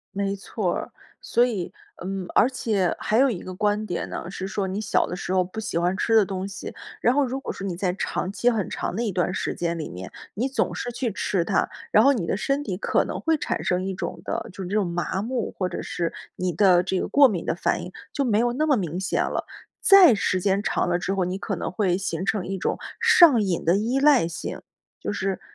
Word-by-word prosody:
没 200 Hz, 0 st, -1 dB
错 195 Hz, -1 st, -2 dB
儿。 -, -, -5 dB, 0.3 s
所 240 Hz, +1 st, +3 dB
以 210 Hz, -8 st, -3 dB, 0.3 s
嗯， 190 Hz, 0 st, -3 dB
而 235 Hz, -, +5 dB
且 210 Hz, -8 st, 0 dB
还 215 Hz, -, +1 dB
有 270 Hz, +2 st, +5 dB
一 200 Hz, -8 st, -3 dB
个 185 Hz, -, -7 dB
观 210 Hz, +2 st, 0 dB
点 175 Hz, -4 st, -3 dB
呢， 170 Hz, -, -5 dB
是 190 Hz, 0 st, -5 dB
说 200 Hz, -1 st, -2 dB
你 190 Hz, +3 st, -3 dB
小 -, -, +1 dB
的 -, -, -4 dB
时 180 Hz, -, -4 dB
候 185 Hz, -, +4 dB
不 185 Hz, +5 st, -7 dB
喜 215 Hz, -, -3 dB
欢 175 Hz, +2 st, +1 dB
吃 225 Hz, +3 st, +1 dB
的 215 Hz, -, +5 dB
东 190 Hz, -1 st, -4 dB
西， 200 Hz, -, -8 dB, 0.2 s
然 240 Hz, -, +3 dB
后 290 Hz, -, +4 dB
如 260 Hz, +1 st, -3 dB
果 270 Hz, -, -5 dB
说 195 Hz, -, -7 dB
你 185 Hz, -3 st, -3 dB
在 180 Hz, -1 st, 0 dB
长 185 Hz, -1 st, -2 dB
期 240 Hz, +4 st, +2 dB
很 215 Hz, -5 st, -1 dB
长 -, -, -3 dB
的 230 Hz, -, -1 dB
一 220 Hz, -, -1 dB
段 180 Hz, -1 st, 0 dB
时 -, -, -2 dB
间 170 Hz, -1 st, -2 dB
里 155 Hz, -, -4 dB
面， 90 Hz, +1 st, -8 dB, 0.2 s
你 245 Hz, +7 st, -1 dB
总 265 Hz, -, -1 dB
是 245 Hz, -, -4 dB
去 240 Hz, -1 st, -2 dB
吃 185 Hz, -3 st, 0 dB
它， -, -, +1 dB, 0.2 s
然 -, -, +6 dB
后 280 Hz, -, +6 dB
你 215 Hz, -11 st, -1 dB
的 -, -, 0 dB
身 275 Hz, +8 st, 0 dB
体 195 Hz, -9 st, -3 dB
可 -, -, +1 dB
能 -, -, -4 dB
会 320 Hz, -1 st, +2 dB
产 -, -, -2 dB
生 180 Hz, +1 st, 0 dB
一 195 Hz, -, -2 dB
种 -, -, -5 dB
的 -, -, -3 dB
就 190 Hz, +1 st, -7 dB
是 -, -, -5 dB
这 200 Hz, -, -2 dB
种 210 Hz, -2 st, +2 dB
麻 175 Hz, +2 st, -2 dB
木， 235 Hz, +1 st, -2 dB
或 185 Hz, -2 st, -1 dB
者 -, -, -5 dB
是 170 Hz, -1 st, -2 dB, 0.2 s
你 180 Hz, 0 st, -1 dB
的 180 Hz, 0 st, +4 dB
这 190 Hz, -, -1 dB
个 -, -, -2 dB
过 280 Hz, -1 st, +6 dB
敏 185 Hz, -6 st, -3 dB
的 -, -, 0 dB
反 -, -, 0 dB
应， 180 Hz, -, -8 dB, 0.2 s
就 280 Hz, -, -1 dB
没 220 Hz, -4 st, +2 dB
有 240 Hz, +1 st, +2 dB
那 305 Hz, +5 st, +1 dB
么 295 Hz, -3 st, +4 dB
明 175 Hz, -5 st, -2 dB
显 190 Hz, -, 0 dB
了。 -, -, -2 dB, 0.4 s
再 390 Hz, -, +8 dB
时 185 Hz, -2 st, 0 dB
间 195 Hz, +1 st, +2 dB
长 205 Hz, -, 0 dB
了 175 Hz, 0 st, +1 dB
之 190 Hz, +2 st, -2 dB
后， 195 Hz, -1 st, +1 dB
你 180 Hz, +1 st, -2 dB
可 195 Hz, 0 st, -3 dB
能 -, -, -4 dB
会 185 Hz, -2 st, +1 dB
形 185 Hz, -2 st, -3 dB
成 195 Hz, -2 st, 0 dB
一 195 Hz, +1 st, -3 dB
种 -, -, -1 dB, 0.2 s
上 300 Hz, -10 st, +7 dB
瘾 185 Hz, -4 st, -1 dB
的 170 Hz, +3 st, +4 dB
依 235 Hz, +6 st, 0 dB
赖 280 Hz, -, +5 dB
性， 165 Hz, -, -6 dB, 0.4 s
就 -, -, -3 dB
是 195 Hz, -2 st, -2 dB
195 Hz, 270 characters per minute, -24 LUFS, 180-230 Hz, 0.4 s, 再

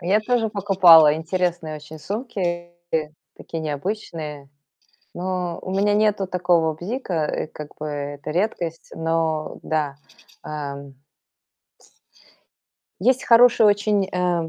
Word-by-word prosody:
Я 190 Hz, +5 st, +2 dB
тоже 230 Hz, 0 st, +1 dB
покупала 180 Hz, -7 st, +6 dB
интересные 165 Hz, -1 st, -2 dB
очень 155 Hz, +1 st, -11 dB
сумки, 185 Hz, -, -4 dB, 0.6 s
такие 165 Hz, -, -6 dB
необычные. 150 Hz, -2 st, -5 dB, 0.7 s
Но 180 Hz, -1 st, -3 dB
у 185 Hz, -, -7 dB
меня 205 Hz, +2 st, +2 dB
нету 210 Hz, -2 st, +2 dB
такого 175 Hz, -3 st, +1 dB
бзика, 175 Hz, -, -3 dB
и -, -, -3 dB
как 150 Hz, -1 st, -10 dB
бы 155 Hz, -, -5 dB
это 145 Hz, 0 st, -5 dB
редкость, 170 Hz, -2 st, -2 dB
но 165 Hz, -1 st, -1 dB
да. 150 Hz, -3 st, -1 dB, 0.5 s
Ам 140 Hz, -2 st, -6 dB, 2.1 s
Есть 255 Hz, +5 st, +2 dB
хорошие 235 Hz, -1 st, +6 dB
очень, 205 Hz, -1 st, +2 dB
а, 175 Hz, -2 st, 0 dB
175 Hz, 110 wpm, -22 LUFS, 155-200 Hz, 2.1 s, покупала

